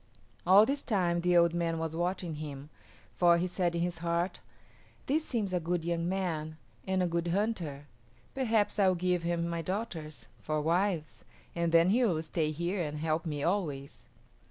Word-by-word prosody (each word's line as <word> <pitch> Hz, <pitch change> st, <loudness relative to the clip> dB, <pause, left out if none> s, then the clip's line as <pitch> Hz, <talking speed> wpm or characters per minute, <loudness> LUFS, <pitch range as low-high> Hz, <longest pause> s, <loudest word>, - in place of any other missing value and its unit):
All 195 Hz, +4 st, +8 dB
this 275 Hz, +3 st, -1 dB
time 175 Hz, -6 st, +1 dB
the 175 Hz, 0 st, +3 dB
old 170 Hz, -1 st, +5 dB
man 170 Hz, -1 st, 0 dB
was 160 Hz, 0 st, -3 dB
watching 175 Hz, -2 st, -2 dB
him, 145 Hz, -1 st, -7 dB, 0.5 s
for 175 Hz, -1 st, +5 dB
he 175 Hz, -, 0 dB
said 180 Hz, -1 st, -1 dB
in 170 Hz, -, 0 dB
his 175 Hz, -1 st, -3 dB
heart, 170 Hz, +2 st, -1 dB, 0.7 s
"This 300 Hz, +4 st, +1 dB
seems 215 Hz, -10 st, -2 dB
a 180 Hz, -, +2 dB
good 170 Hz, 0 st, -2 dB
young 170 Hz, 0 st, -1 dB
man 160 Hz, -5 st, -2 dB, 0.3 s
and 190 Hz, -1 st, +1 dB
a -, -, +1 dB
good 170 Hz, 0 st, -1 dB
hunter. 170 Hz, -7 st, -1 dB, 0.5 s
Perhaps 225 Hz, -6 st, +1 dB
I 195 Hz, -, +5 dB
will 185 Hz, -, +3 dB
give 180 Hz, 0 st, 0 dB
him 170 Hz, 0 st, -1 dB
my 170 Hz, 0 st, -2 dB
daughters 165 Hz, -4 st, -5 dB
for 155 Hz, 0 st, -2 dB
wives, 170 Hz, +1 st, 0 dB, 0.3 s
and 170 Hz, -1 st, 0 dB
then 170 Hz, +2 st, +5 dB
he 245 Hz, +4 st, +3 dB
will 170 Hz, -8 st, +1 dB
stay 160 Hz, -1 st, -1 dB
here 170 Hz, +5 st, -2 dB
and 150 Hz, -2 st, -3 dB
help 160 Hz, +2 st, -1 dB
me 145 Hz, -2 st, -3 dB
always." 150 Hz, -8 st, -2 dB
170 Hz, 180 wpm, -31 LUFS, 160-185 Hz, 0.7 s, All